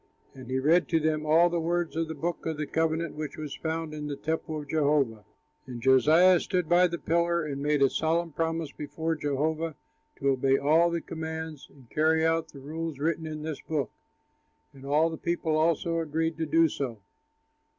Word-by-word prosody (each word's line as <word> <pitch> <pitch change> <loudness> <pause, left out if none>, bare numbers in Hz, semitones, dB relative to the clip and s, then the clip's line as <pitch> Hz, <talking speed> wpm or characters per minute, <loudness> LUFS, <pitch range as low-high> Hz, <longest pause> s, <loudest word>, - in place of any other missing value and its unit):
And 130 -2 -11
he 130 - 0
read 160 +7 +3
to 165 - +2
them 155 -1 0
all 165 +3 +6
the 175 -1 -1
words 170 0 -1
of 165 0 -1
the 160 - -5
book 165 +4 -3
of 160 -2 -2
the 150 - -2
covenant 160 +1 -1
which 155 -1 -6
was 150 -2 -5
found 160 -1 -3
in 150 -1 -5
the 145 - -3
temple 160 +1 -3
of 145 - -9
Jehovah. 140 -9 +1 0.4
And 125 -2 -6
Josiah 155 +9 +5
stood 180 -3 -1
by 175 +2 +5
the 170 0 -4
pillar 170 0 +1
and 140 -2 -4
made 145 -1 +2
a 135 - +5
solemn 165 +1 0
promise 165 -1 -2
before 160 +3 -3
Jehovah 155 +2 -1 0.4
to 140 - 0
obey 135 0 +3
all 160 +5 +4
the 170 -1 -2
commands 160 -2 -6
and 135 -4 -19
carry 160 +1 +2
out 165 0 +1
the - - -14
rules 160 +1 -5
written 160 +2 -1
in 155 -1 -6
this 155 -2 -5
book. 145 -7 -2 0.8
And 135 0 -13
all 155 +3 +3
the 160 - -5
people 170 -2 -1
also 165 +1 +1
agreed 160 +1 -1
to 160 -1 -2
do 165 +2 +4
so. 135 -6 -4
160 Hz, 195 wpm, -28 LUFS, 145-165 Hz, 0.8 s, all